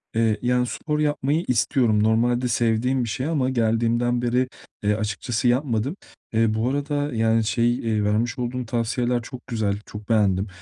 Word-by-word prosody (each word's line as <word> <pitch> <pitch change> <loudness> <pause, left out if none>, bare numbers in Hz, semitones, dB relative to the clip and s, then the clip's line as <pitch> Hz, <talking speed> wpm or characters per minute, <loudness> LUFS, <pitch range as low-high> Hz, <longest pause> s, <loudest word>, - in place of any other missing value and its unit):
Eee, 110 -1 +2
yani, 125 0 +2
spor 150 +4 -3
yapmayı 150 +1 +1
istiyorum. 115 -3 +2
Normalde 120 +3 +2
sevdiğim 120 +2 +1
bir 115 - -3
şey 130 +5 -3
ama 145 -6 +1
geldiğimden 120 0 +1
beri, 125 +1 +1 0.4
eee, 105 0 +2
açıkçası 110 +3 -2
yapmadım. 125 - +1 0.4
E, 110 -1 +2
bu 110 +3 0
arada, 145 +1 -1
yani, 115 0 +2
şey, 115 +3 +1
eee, 110 -2 0
vermiş 110 +5 0
olduğun 125 +1 -2
tavsiyeler 120 +1 0
çok 125 +2 -10
güzel, 110 -5 -1
çok 105 -1 -10
beğendim. 100 -3 +2
120 Hz, 160 wpm, -23 LUFS, 110-125 Hz, 0.4 s, Eee